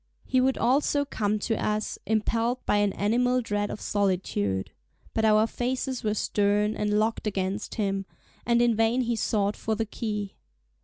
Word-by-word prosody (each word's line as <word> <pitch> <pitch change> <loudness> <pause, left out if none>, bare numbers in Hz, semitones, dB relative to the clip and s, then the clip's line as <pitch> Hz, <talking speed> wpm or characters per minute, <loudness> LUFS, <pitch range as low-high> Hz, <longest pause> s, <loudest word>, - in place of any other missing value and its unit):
He 255 - +2
would 265 +1 +2
also 285 +3 +2
come 215 -6 -1
to 225 +2 -2
us, 215 0 -1
impelled 230 +3 0
by - - +2
an 205 -1 +2
animal 245 +5 +2
dread 205 -3 -1
of - - -5
solitude. 180 - -1 0.4
But 220 - +1
our 215 0 +5
faces 255 +2 -2
were 215 -1 0
stern, 210 +1 +1
and 210 0 0
locked 220 +1 0
against 195 +1 -2
him, 195 -3 -1 0.4
and 235 0 +3
in 235 -2 +3
vain 225 +3 +2
he 240 -1 0
sought 205 -2 0
for 220 - -2
the 225 +1 -1
key. 210 -2 -4
215 Hz, 165 wpm, -27 LUFS, 205-235 Hz, 0.4 s, our